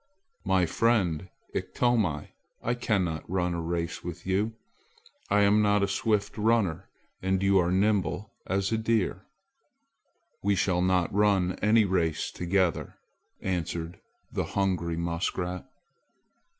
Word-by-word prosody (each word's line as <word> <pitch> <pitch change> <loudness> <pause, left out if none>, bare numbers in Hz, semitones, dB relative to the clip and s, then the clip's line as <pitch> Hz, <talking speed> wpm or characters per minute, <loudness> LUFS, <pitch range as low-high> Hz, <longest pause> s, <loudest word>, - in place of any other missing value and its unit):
"My 95 -2 +3
friend 95 -3 +1 0.2
Ikto, 105 -12 0 0.4
I 120 - +1
cannot 95 -11 -1
run 90 -1 0
a 85 - -2
race 85 0 -3
with 90 +1 -7
you! 100 +4 0 0.8
I 105 +1 +4
am 100 +1 +5
not 105 -1 +3
a - - +2
swift 105 +2 0
runner, 105 -6 +1 0.3
and 95 0 0
you 95 0 +4
are 85 0 +1
nimble 100 0 +1 0.2
as 95 +1 0
a 110 - +1
deer. 110 -4 0 1.1
We 100 0 +2
shall 90 -1 +1
not 90 -1 +1
run 100 -3 +3
any 105 +1 +5
race 85 -5 0
together," 90 -1 0 0.5
answered 85 -2 -3 0.3
the - - -1
hungry 90 -4 0
muskrat. 90 +1 -2
95 Hz, 125 wpm, -28 LUFS, 85-105 Hz, 1.1 s, am